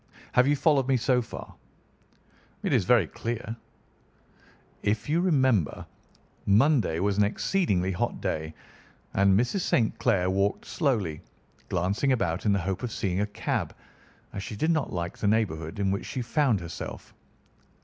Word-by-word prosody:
Have 125 +1 +4
you 145 - +4
followed 145 -3 +3
me 135 -1 +3
so 125 +1 +2
far?" 115 - -9 1.1
"It - - 0
is - - +3
very - - +5
clear." 115 0 -5 1.3
"If 105 +1 -1
you 160 +4 +2
remember, 130 - +2 0.6
Monday 110 - +3
was 100 +2 +1
an - - +6
exceedingly 100 - +1
hot 90 - -2
day, 80 0 -3 0.6
and 100 0 +4
Mrs. 125 - 0
St. 115 -8 +1
Clair 100 -7 +2
walked 100 +1 0
slowly, 105 - -1 0.5
glancing 95 +10 +1
about 100 -4 -1
in - - +4
the - - +2
hope 95 +1 -3
of 125 - -3
seeing 95 -2 -1
a 105 - 0
cab, 105 - -3 0.6
as 100 - -4
she 105 - -6
did 155 +10 +1
not 155 -4 0
like 85 0 -4
the 105 - 0
neighbourhood 100 -5 0
in 100 -1 +1
which 100 - -3
she 125 - -3
found 120 - +1
herself. 85 -1 -7
105 Hz, 155 wpm, -27 LUFS, 95-130 Hz, 1.3 s, an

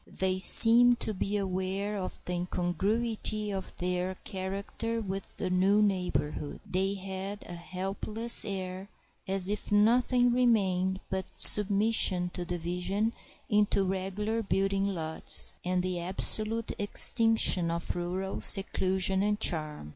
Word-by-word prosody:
They 185 0 -2
seemed 235 +5 +7
to 220 - -1
be 200 +1 -3
aware 195 +1 -3
of 190 -2 -6
the 180 - -4
incongruity 210 +5 -2
of 190 -1 -6
their 180 +1 -3
character 200 +4 -5
with 195 -2 -7
the 185 - -3
new 190 +3 +2
neighborhood. 180 -7 -3
They 195 +2 -2
had 195 +1 -7
a - - -9
helpless 195 +6 -1
air, 190 0 -6 0.4
as 190 -1 +2
if 210 +1 -5
nothing 245 +4 +2
remained 190 -6 0
but 190 0 -6
submission 200 -3 +4
to 180 - -6
division 180 +6 -3 0.3
into 210 -2 +1
regular 195 +4 -3
building 195 0 -1
lots 160 -5 +1
and 180 0 -2
the 180 -1 -3
absolute 215 +5 0
extinction 210 -3 +3
of 170 0 -4
rural 180 +2 -5
seclusion 190 -1 +1
and 210 +1 -1
charm. 155 - 0
195 Hz, 125 wpm, -28 LUFS, 185-210 Hz, 0.4 s, seemed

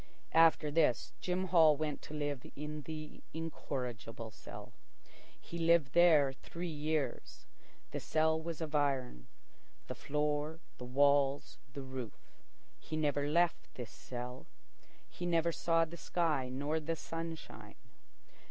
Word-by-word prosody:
After 165 -2 +5
this, 150 -5 +2
Jim 185 +1 0
Hall 160 -4 +6
went 150 -1 -2
to 155 - -8
live 145 -3 -2
in 150 +1 -5
the 155 -1 -7
incorrigible 125 -8 -4
cell. - - -10 0.7
He 170 - -7
lived 165 -4 +4
there 155 -6 +6
three 170 +5 -6
years. 155 -1 -2 0.5
The - - -2
cell 160 0 +2
was 165 0 -5
of 155 -2 -4
iron, 130 - 0 0.6
the - - -5
floor, 150 +2 -1 0.2
the 125 - -6
walls, 140 +1 +3
the 140 -2 -5
roof. 130 -4 -7 0.5
He 155 - -5
never 145 -2 +1
left 170 +2 +1
this 120 -4 -6
cell. 125 0 -7 0.6
He 175 - -5
never 170 -1 +3
saw 165 0 +2
the 170 +2 -9
sky 155 -7 0
nor 145 +5 -1
the 160 +2 -2
sunshine. 165 0 -6
150 Hz, 130 wpm, -34 LUFS, 140-165 Hz, 0.7 s, Hall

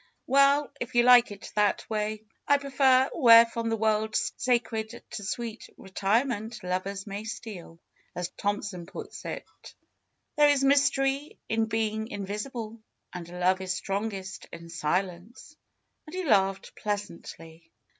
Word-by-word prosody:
^^Well, 280 +2 +4
if 245 - -5
you 240 - +6
like 245 -1 +7
it 200 - -9
that 210 -1 +1
way. 215 0 -2 0.2
I 285 - +5
prefer 270 -2 +3
^Where 230 -6 +8
from 230 0 -3
the 225 - 0
world 215 0 0
sacred 230 -1 -1
to 205 - -6
sweet 225 +4 -5
retirement 220 +4 -1
lovers 190 +2 -3
may 200 0 -6
steal,^ 210 -7 -8 0.4
as 180 0 -3
Thomson 200 -4 -3
puts - - -9
it. - - -5 0.9
There 295 0 +6
is 285 -2 +3
mystery 275 +1 +2
in 225 0 +1
being 220 -1 -1
invis 205 +3 -5
ible. 230 -2 -6 0.3
And 175 -2 -7
love 180 +1 +1
is 185 -1 -2
strongest 195 0 -4
in 170 0 -10
silence," 180 - -3 0.5
and 310 - -9
he 370 - -2
laughed 195 - +1
pleasantly. 170 -5 -6
215 Hz, 135 wpm, -28 LUFS, 195-245 Hz, 0.9 s, ^Where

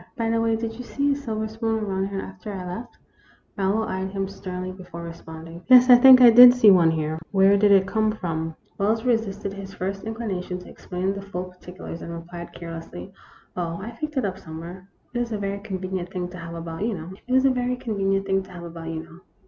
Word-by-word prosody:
By 225 -1 0
the 230 0 +1
way, 225 0 +2
did 225 0 -4
you - - -5
see 285 +3 0
a - - +2
silver 220 -6 -3
spoon 220 0 -2
around 190 -1 -1
here 195 -1 -4
after 190 +2 -8
I 190 -2 -6
left? 225 +7 -7 0.3
" - - -33
Marlowe 200 +3 0
eyed 190 -1 -3
him 195 0 -3
sternly 185 -1 -6
before 180 -2 -10
responding. 165 0 -10
" - - -37
Yes, 255 0 +8
I - - +12
think 255 +1 +9
I 240 -2 +10
did 245 +2 +10
see 225 -5 +7
one 175 -3 +5
here. 160 0 -2
Where 195 0 +5
did 205 0 +4
it 195 -1 +6
come 215 +2 +1
from? 165 -6 -4
" - - -37
Wells 220 +3 +1
resisted 205 -5 -1
his 195 0 -9
first 195 +1 -4
inclination 210 -5 -4
to 180 - -12
explain 185 +2 -3
the 200 - -6
full 195 -2 -5
particulars, 180 -2 -10
and 170 - -7
replied, 170 +1 -8
carelessly: 170 +3 -9 0.2
" - - -28
Oh, 170 -2 -3
I 215 +4 -6
picked 300 +5 -6
it 260 - +1
up 190 -1 -3
somewhere. 170 +4 -9 0.2
It 240 - -1
is 235 -1 -3
a - - -1
very 200 0 -3
convenient 185 -3 -4
thing 180 -2 -4
to 180 - -10
have 170 0 -7
about, 165 +2 -5
you 225 -1 -1
know. 165 +1 -8
195 Hz, 205 wpm, -24 LUFS, 180-220 Hz, 0.3 s, I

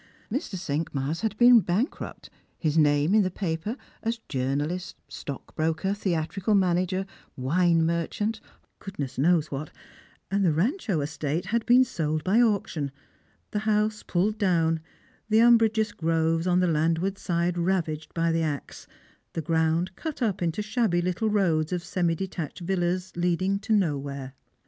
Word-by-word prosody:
Mr. 250 - -3
Cinq« 160 -4 -3
mars 140 +5 -2
had 220 -2 -2
been 240 0 +8
bankrupt, 205 - -3 0.3
his 155 -2 -1
name 150 +2 +3
in 215 - +6
the 185 - +1
papers 180 +3 -3 0.3
as 230 +1 -1
journalist, 145 +7 -2
stockbroker, 160 +6 -3
theatrical 195 +2 -1
manager, 185 0 +1 0.3
wine 165 +5 +2
merchant 205 +7 -1 0.2
— - - -41
goodness 140 -10 -5
knows 160 +1 +3
what; 145 +2 -4 0.6
and 200 0 +2
the 175 - +4
Rancho 205 - 0
estate 150 +3 -2
had 225 +4 0
been 250 +2 +7
sold 155 -11 -2
by 210 +6 +4
auction, 200 -10 0 0.6
the 210 - -1
house 215 0 +1
pulled 205 +5 0
down, 165 -4 +2 0.5
the 215 - +4
umbrageous 225 -2 +4
groves 165 -1 0
on 180 0 +3
the - - +3
landward 165 +4 +1
side 170 0 0
ravaged 170 -3 -1
by 165 0 +1
the 165 0 +1
axe, 150 -3 -4 0.5
the 165 - -2
ground 165 +3 +1
cut 315 -3 -5
up 210 -7 0
into 170 +4 -1
shabby 215 -4 +1
little 185 +5 0
roads 170 -7 +1
of 180 -1 -2
semi 175 -2 0
detached 180 -2 -5
villas 180 0 -1
leading 180 +3 +1
to 220 +2 -6
nowhere. 140 -9 0
175 Hz, 150 wpm, -26 LUFS, 160-205 Hz, 0.6 s, been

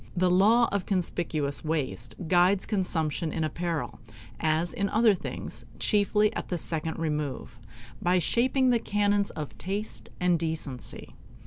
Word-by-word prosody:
The 180 0 +3
law 220 +6 +5
of 200 -2 -1
conspicuous 165 -6 -1
waste 145 -6 -2
guides 180 +3 +4
consumption 165 -6 0
in 160 - -1
apparel, 160 -4 -3 0.4
as 160 +2 +1
in 200 0 -1
other 220 0 +5
things, 185 - -5
chiefly 210 0 +2
at - - -3
the 180 - -2
second 160 0 -2
remove, 150 -6 -3 0.4
by 180 +1 +3
shaping 255 +7 +2
the 235 - +3
canons 205 -1 +1
of 150 -3 -6
taste 200 +4 -4
and 180 -2 +3
decency. 155 -6 -5
175 Hz, 135 wpm, -28 LUFS, 155-200 Hz, 0.4 s, law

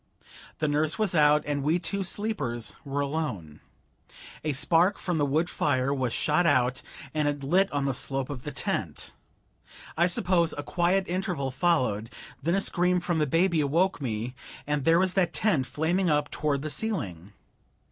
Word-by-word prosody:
The 155 - 0
nurse 150 +2 +1
was 215 -5 0
out, 150 -2 +4
and 145 -1 -1
we 155 +5 +2
two 195 +3 -2
sleepers 150 - -2
were 140 -1 -2
alone. 140 - -4 0.8
A 155 - 0
spark 165 +7 +3
from 175 -4 -2
the 145 - +2
wood 155 +5 +1
fire 140 -4 0
was 130 -4 -1
shot 155 +8 +1
out, 125 -3 +2 0.3
and 155 -1 0
it 145 -1 -2
lit 185 +8 +2
on 145 -1 -1
the 135 - 0
slope 135 +2 -2
of 130 -3 -6
the 150 - -5
tent. 140 - -3 0.8
I 170 +2 +3
suppose 175 -1 +2
a 145 - -4
quiet 180 +4 +1
interval 175 -7 -2
followed, 130 -8 +1 0.3
then 170 +5 +1
a 195 - +1
scream 180 -1 +2
from 175 -2 -1
the 150 - +1
baby 165 +2 +2
awoke 165 +5 +1
me, 120 -1 -3 0.3
and 145 -2 -1
there 165 +1 +5
was 185 0 +2
that 185 -2 +1
tent 160 -12 +1
flaming 175 +4 0
up 150 -1 +1
toward 145 -2 -1
the 155 - -3
ceiling! 100 - -3
150 Hz, 175 wpm, -27 LUFS, 135-175 Hz, 0.8 s, there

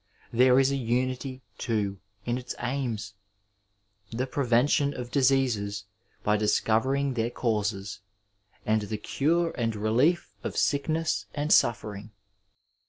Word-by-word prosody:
There 125 +2 +5
is 135 0 +3
a 140 - 0
unity, 130 +1 -2 0.2
too, 105 -5 -1 0.3
in 120 +1 -1
its 125 - -6
aims 120 -6 -3 0.5
— 100 +1 -47
the 120 +3 -1
prevention 140 +2 +2
of 120 -1 -6
diseases 120 -7 +1 0.4
by 105 0 +2
discovering 130 +6 +1
their 115 -1 0
causes, 105 -4 -2 0.7
and 110 0 +2
the 105 +1 -4
cure 165 +9 0
and 115 -3 -1
relief 120 +11 +2
of - - -5
sickness 155 +3 0
and 150 +2 +2
suffering. 105 -2 +1
120 Hz, 120 wpm, -27 LUFS, 105-135 Hz, 0.7 s, There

